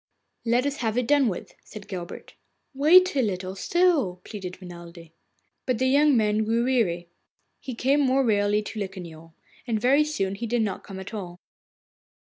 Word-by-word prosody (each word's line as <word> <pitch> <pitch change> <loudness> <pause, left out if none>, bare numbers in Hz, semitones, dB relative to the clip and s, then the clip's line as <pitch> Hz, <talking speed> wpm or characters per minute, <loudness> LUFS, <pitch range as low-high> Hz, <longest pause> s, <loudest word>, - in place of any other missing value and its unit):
'Let 240 +3 +2
us 285 +1 -2
have 240 0 -1
done 285 0 +3
with 190 - -4
it,' - - -27
said 210 -2 -11
Guilbert. 175 -3 -8 0.4
'Wait 340 +6 +5
a 270 - +3
little 190 -4 -3
still,' 295 - +1
pleaded 190 -4 -7
Renelde. 170 -2 -11 0.6
But 255 -3 +1
the 260 - 0
young 280 +1 +4
man 215 0 +2
grew 230 +2 +1
weary. 185 -10 0 0.5
He 260 -3 -7
came 270 +5 +2
more 270 -1 +2
rarely 205 -1 +2
to 215 - -7
Locquignol, 170 -5 -8 0.3
and 225 -2 0
very 270 +6 +4
soon 195 -11 -2
he 230 +4 -5
did 235 0 +1
not 200 -3 -3
come 195 -1 -9
at 190 +4 -9
all. 180 -4 -7
220 Hz, 170 wpm, -25 LUFS, 190-260 Hz, 0.6 s, Wait